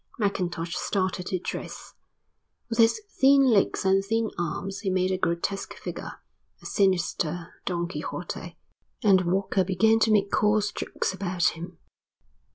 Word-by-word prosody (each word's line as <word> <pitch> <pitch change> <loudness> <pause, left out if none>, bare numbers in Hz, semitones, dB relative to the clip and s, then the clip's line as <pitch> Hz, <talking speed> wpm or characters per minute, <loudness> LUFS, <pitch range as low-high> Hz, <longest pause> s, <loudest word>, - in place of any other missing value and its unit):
Mackintosh 180 -5 -2
started 185 -2 -1
to 185 - -1
dress. 180 - -7 0.8
With 230 0 -3
his 230 - +5 0.2
thin 275 0 +6
legs 220 -7 +2
and 195 0 +3
thin 225 +2 0
arms 195 +3 -3
he 200 -2 -2
made 185 0 +1
a 185 - 0
grotesque 170 +3 -2
figure, - - -6 0.5
a - - -18
sinister 175 -3 0
Don 175 -2 -1
Quixote, 180 - -6 0.5
and 190 -4 +4
Walker 190 0 +1
began 210 +5 +3
to 225 - +3
make 200 -2 +3
coarse 210 0 +2
jokes - - -3
about 185 -2 +1
him. 165 +2 -9
190 Hz, 140 wpm, -26 LUFS, 180-210 Hz, 0.8 s, thin